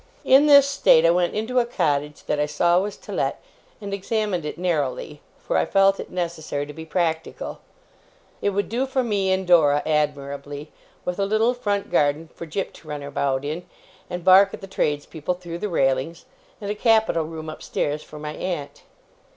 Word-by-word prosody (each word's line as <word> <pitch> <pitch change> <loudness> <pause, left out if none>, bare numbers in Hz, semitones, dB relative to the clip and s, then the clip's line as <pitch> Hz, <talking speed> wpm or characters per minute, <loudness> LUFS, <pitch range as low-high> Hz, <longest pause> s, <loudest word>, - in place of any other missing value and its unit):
In 275 +3 +6
this 280 -1 +8
state, 220 -12 +4
I 165 - +6
went 175 0 +1
into 230 +4 0
a 240 - +2
cottage 150 -9 -1
that 150 - -1
I 150 - +1
saw 170 +4 +3
was 205 +1 -4
to - - -11
let, - - -1 0.4
and 200 -2 -6
examined 200 -3 -1
it 150 - -5
narrowly, 150 -4 -2 0.2
for - - -2
I - - +2
felt 195 0 +4
it - - -6
necessary 165 -5 -3
to 150 - -9
be 160 +2 -8
practical. 160 -1 -2 0.8
It - - +2
would 200 +1 -1
do 250 +4 -1
for 260 -1 0
me 200 -5 0
and 190 0 0
Dora 150 -5 +4
admirably: 145 -1 -2 0.3
with 180 +2 -3
a 200 - +2
little 220 +4 +2
front 205 -5 -2
garden 150 +2 +1
for 170 - -8
Jip 190 +5 -3
to 160 - -16
run 150 -1 -5
about 140 -1 -1
in, 155 +4 -4 0.5
and 180 -1 -5
bark 195 +1 +7
at - - -16
the - - -7
tradespeople 155 -1 -2
through 175 -1 -7
the 210 - -3
railings, 135 +1 0 0.3
and 205 -2 -4
a - - 0
capital 220 -6 +2
room 160 0 -7
upstairs 150 -1 -3
for 150 - -12
my 150 0 -5
aunt. 145 -6 -5
170 Hz, 190 wpm, -23 LUFS, 150-200 Hz, 0.8 s, this